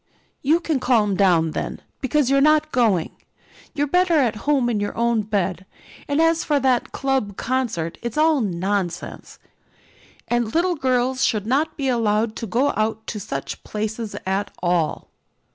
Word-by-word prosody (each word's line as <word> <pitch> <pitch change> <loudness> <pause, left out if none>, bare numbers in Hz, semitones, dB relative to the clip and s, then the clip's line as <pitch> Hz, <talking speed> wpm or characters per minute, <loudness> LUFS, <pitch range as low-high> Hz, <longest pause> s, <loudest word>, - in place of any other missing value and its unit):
"You 310 +5 +3
can 320 -5 -1
calm 225 -6 +2
down 175 -5 +3
then, - - -4 0.2
because 280 0 +1
you're 275 0 +4
not 305 +1 +3
going. 215 -9 +2 0.6
You're 290 -1 +1
better 360 +3 +2
at 255 -8 +2
home 275 -5 +3
in 230 -3 0
your 205 0 -3
own 235 -1 +2
bed, 195 -3 -2 0.4
and 285 +1 0
as 325 0 +3
for 295 -2 +1
that 260 -2 +1
club 265 -8 -1
concert, 230 -11 -2
it's 235 +1 -5
all 310 -2 +3
nonsense, 185 -2 -3 0.9
and 240 0 -1
little 355 +2 +2
girls 255 -2 0
should 210 -2 +1
not 290 +7 0
be 275 -2 -1
allowed 225 -2 +1
to 230 - -5
go 255 +7 +1
out 220 0 -1
to 215 - -5
such 135 -8 -5
places 215 +1 -4
at 195 +2 -1
all." 175 -3 0
235 Hz, 160 wpm, -22 LUFS, 205-275 Hz, 0.9 s, you're